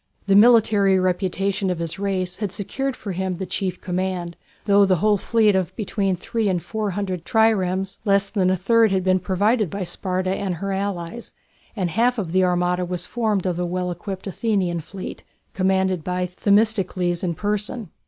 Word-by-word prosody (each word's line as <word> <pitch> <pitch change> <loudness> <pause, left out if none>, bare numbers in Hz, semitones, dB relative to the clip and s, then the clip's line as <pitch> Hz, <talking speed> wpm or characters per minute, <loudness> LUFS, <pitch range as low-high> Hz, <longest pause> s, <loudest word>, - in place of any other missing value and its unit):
The 195 -1 +3
military 210 -3 +5
reputation 190 +1 0
of 180 - -1
his 165 +2 -4
race 190 -2 -2
had 205 -4 -2
secured 260 +7 -3
for 205 - -6
him 185 0 -2
the 190 - -4
chief 185 +1 -3
command, 180 -1 -3 0.3
though 200 -1 +5
of 200 - +5
the 185 - +4
whole 210 +4 +2
fleet 215 0 +2
of 185 -1 -1
between 200 -3 -1
three 220 +5 -2
and 185 -3 +1
four 215 +3 -3
hundred 185 -4 -3
triremes, 195 -4 +1
less 200 -1 +2
than 195 -3 +1
a 185 - +3
third 225 +5 +3
had 190 -1 0
been 185 0 +3
provided 205 +3 +1
by 200 +2 -4
Sparta 185 +1 -2
and 190 -1 -2
her 195 +4 -4
allies, 195 +1 -4 0.4
and 185 -5 -1
half 240 +6 +2
of 185 -7 -3
the 185 +1 +3
armada 180 0 +1
was 180 0 -3
formed 215 -3 -1
of 180 -2 -1
the 180 - -1
well 180 0 -2
equipped 190 +2 -6
Athenian 195 -4 -1
fleet, 185 +4 -8 0.3
commanded 190 -2 +1
by 180 +1 -1
Themistocles 185 -2 +1
in 170 -2 -1
person. 210 +1 -3
190 Hz, 185 wpm, -22 LUFS, 180-205 Hz, 0.4 s, military